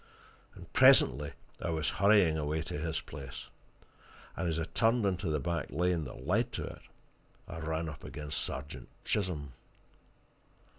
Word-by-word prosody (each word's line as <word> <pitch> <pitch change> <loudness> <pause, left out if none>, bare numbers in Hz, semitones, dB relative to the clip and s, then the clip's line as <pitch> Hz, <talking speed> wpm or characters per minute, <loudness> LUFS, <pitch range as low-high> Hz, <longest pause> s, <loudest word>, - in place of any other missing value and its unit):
And - - -13
presently 70 +3 +6 0.3
I - - -2
was 80 -3 0
hurrying 100 -5 +6
away 75 +1 -1
to 75 - -5
his 80 0 -2
place, 70 -1 -8 0.9
and 90 - -1
as 80 - -1
I 80 - 0
turned 115 +5 +2
into 95 -2 0
the 75 -1 +1
back 85 -1 -2
lane 85 +2 +1
that 65 0 -9
led 110 - +2
to - - -3
it - - -8 0.7
I - - -6
ran 80 +1 -2
up 80 -2 -8
against 75 -2 -4
Sergeant 70 +2 -6 0.2
Chisholm. 80 -9 -1
80 Hz, 150 wpm, -32 LUFS, 75-90 Hz, 0.9 s, presently